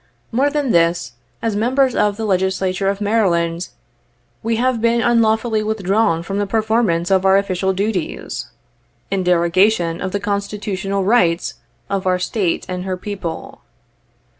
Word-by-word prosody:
More 270 +5 +2
than 290 -4 -1
this, 170 - +2 0.3
as 225 -2 0
members 255 +4 +2
of 205 -1 +1
the 225 - -3
Legislature 190 0 0
of 200 +1 -3
Maryland, 175 -5 +1 0.7
we 225 +1 0
have 245 0 0
been 230 +1 +2
unlawfully 225 -1 +2
withdrawn 210 -4 +1
from 195 +3 -3
the 205 - -1
performance 215 -5 +1
of 190 -1 +3
our 190 0 +5
official 190 -1 0
duties, 190 - -3 0.6
in 195 -1 0
derogation 175 0 +2
65 - - -4
of - - -5
the 205 - -1
constitutional 200 -1 -2
rights 185 -5 +2 0.3
of 195 -1 -2
our 185 0 +3
State 180 -1 -1
and 180 0 -4
her 185 -1 -3
people. 190 -4 -6
200 Hz, 145 wpm, -19 LUFS, 180-220 Hz, 0.7 s, our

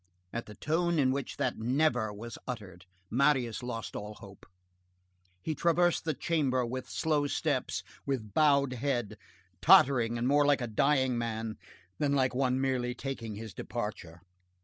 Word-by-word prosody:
At 115 - -4
the 105 - -10
tone 170 - 0
in 130 -3 +3
which 135 -1 -3
that 130 -3 -1
"never" 125 -2 +1
was 110 +3 -8
uttered, 95 -7 -7 0.2
Marius 130 -3 +2
lost 120 -2 -5
all 105 +1 -6
hope. 100 -2 -14 1.0
He 160 - -1
traversed 170 +2 +2
the 155 -3 0
chamber 135 -6 +1
with 130 +2 -5
slow 150 -2 +1
steps, 145 -3 -1 0.2
with 115 -7 -3
bowed 140 -2 +4
head, 125 -3 -2 0.5
tottering 120 -4 +6
and 120 +1 0
more 145 +2 +4
like 145 -2 +3
a - - 0
dying 130 +2 +2
man 110 -1 -3 0.4
than 145 -1 +1
like 130 -2 +2
one 130 0 +1
merely 125 -2 0
taking 120 -5 -5
his 110 0 -8
departure. 100 -7 -6
125 Hz, 150 wpm, -30 LUFS, 115-140 Hz, 1.0 s, tottering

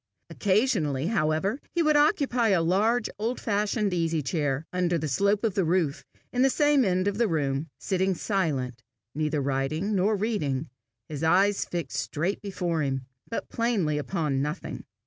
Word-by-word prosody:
Occasionally, 185 - +1
however, 160 - +1 0.2
he 340 - +3
would 305 -1 +3
occupy 285 - +3
a 190 -5 +3
large 215 +7 +2
old 230 +4 -1
fashioned 210 -1 0
easy 165 -3 0
chair, 145 -1 -1
under 180 -1 +1
the 155 -1 -2
slope 200 - +1
of 220 -4 +1
the 195 - +1
roof, 165 -3 0 0.3
in 250 - +1
the 270 - +5
same 290 -1 +3
end 185 -2 +1
of 205 +1 -1
the 235 - +3
room, 145 -3 -1
sitting 190 0 0
silent, 145 - -1 0.3
neither 150 0 -1
writing 140 +9 -1
nor 200 +2 +2
reading, 160 - -1 0.4
his 150 0 -5
eyes 195 +5 +3
fixed 165 -9 -3
straight 170 +7 -2
before 175 -5 -2
him, 135 -2 -2 0.2
but 230 - -4
plainly 200 -11 0
upon 150 -4 -1
nothing. 150 +5 -4
180 Hz, 160 wpm, -27 LUFS, 150-210 Hz, 0.4 s, the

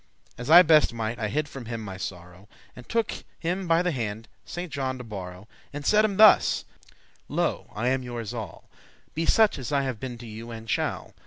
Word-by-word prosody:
As 125 +3 -7
I 175 +3 +10
best 155 -6 +4
might, 115 +1 -3
I 110 - -1
hid 150 +6 -1
from 135 -4 -9
him 115 0 -4
my 95 -3 -7
sorrow, 90 +1 -8 0.3
And 125 - -13
took 230 -2 0 0.2
him 180 +2 -2
by 165 +1 +3
the 180 - +1
hand, 115 -4 -4 0.2
Saint 175 -1 -6
John 130 -3 -2
to 125 - -8
borrow,* 95 -5 -7
*witness, - - -16 0.2
pledge - - -30
And 145 0 -6
said 215 +5 +5
him 200 -3 -2
thus; 215 0 +6 0.6
'Lo, - - -1
I 115 +4 0
am 130 0 +1
youres 120 -4 -6
all; - - -7 0.5
Be 165 +2 -2
such 220 -8 +4
as 130 +1 -5
I 140 -1 +2
have 130 -5 -3
been 125 -2 -6
to 120 - -10
you, 115 +1 -8
and 115 -1 -8
shall. - - -2
125 Hz, 220 wpm, -26 LUFS, 110-160 Hz, 0.6 s, I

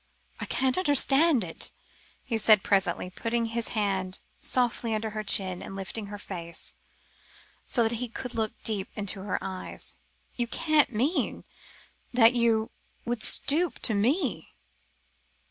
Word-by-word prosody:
"I - - -3
can't 260 +4 +1
understand 290 - +3
it," 165 -2 -3 0.5
he 240 - -3
said 215 -2 +6
presently, 190 -2 +1
putting 230 +4 -1
his 230 0 -2
hand 190 -3 -1 0.2
softly 240 -2 +1
under 215 0 -3
her 215 0 -4
chin 190 -3 +1
and 195 - -7
lifting 200 +2 -5
her 205 0 -7
face, 170 -4 -5 0.9
so 240 - +2
that 225 - +1
he 250 +2 -3
could 250 +2 -6
look 220 -1 -1
deep 205 -4 0
into 200 -2 -2
her 195 -1 -2
eyes; 190 -1 -3 0.4
"you 240 -1 -1
can't 305 +3 +2
mean 255 - 0 0.7
that 235 -1 +6
you 230 -2 +2 0.3
would 240 -2 -2
stoop 325 +10 +2
to 220 - +2
me?" 225 - 0
225 Hz, 140 wpm, -28 LUFS, 195-245 Hz, 0.9 s, said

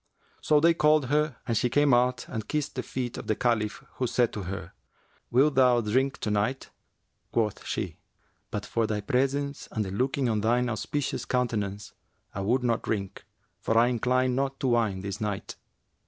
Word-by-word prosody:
So 150 -1 +4
they 165 +2 +5
called 150 -4 +3
her 150 -1 +1
and 115 - -1
she 125 - +2
came 145 +1 +3
out 125 -1 +2
and 110 -3 -5
kissed 150 0 -2
the - - -2
feet 125 -2 -4
of - - -9
the 110 - +1
Caliph, 110 -3 0
who 125 - 0
said 120 0 +1
to 105 - -4
her, 90 -1 -6 0.6
'Wilt 140 +5 +4
thou 125 -2 +5
drink 130 +5 +1
to 105 - -1
night?' 105 +6 -1 0.6
Quoth 110 -3 0
she, - - -3 0.5
'But 105 0 -4
for 115 +1 0
thy 105 -1 -2
presence 140 +5 -1
and 110 -2 -1
the 95 - -5
looking 130 +5 0
on 110 -2 +1
thine 120 +3 +2
auspicious 130 +5 -2
countenance, 105 -5 -2 0.4
I 100 - -4
would 120 +6 +1
not 115 -2 +1
drink, 100 -3 -4 0.3
for 115 - 0
I 120 +2 +5
incline 125 +1 +1
not 135 +1 -1
to 135 - +1
wine 110 -6 +1
this 100 +2 -5
night.' 105 -2 -3
120 Hz, 185 wpm, -27 LUFS, 105-130 Hz, 0.6 s, they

